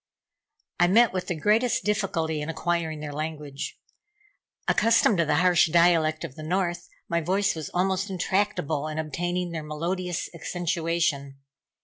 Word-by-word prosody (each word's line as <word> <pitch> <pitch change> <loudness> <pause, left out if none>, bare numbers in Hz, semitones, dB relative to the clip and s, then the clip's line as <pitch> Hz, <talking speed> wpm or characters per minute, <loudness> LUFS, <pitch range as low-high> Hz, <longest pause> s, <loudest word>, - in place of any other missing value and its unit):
I 175 - +5
met 230 +4 +5
with 185 -1 -3
the 175 - -1
greatest 215 +9 +2
difficulty 165 -7 -1
in 150 - -4
acquiring 165 -1 -2
their 150 -1 -5
language. 150 -2 -5 0.9
Accustomed 225 -3 +4
to 170 - +3
the 150 - +1
harsh 175 0 +4
dialect 165 -2 +3
of - - -6
the 155 - -10
North, 175 +1 -2 0.2
my 170 0 0
voice 190 +5 +1
was 160 -3 -6
almost 190 +2 0
intractable 180 -5 -1
in 155 0 -5
obtaining 175 +3 -2
their 165 -1 -4
melodious 175 +4 -3
accentuation. 165 -4 -1
170 Hz, 140 wpm, -26 LUFS, 155-185 Hz, 0.9 s, I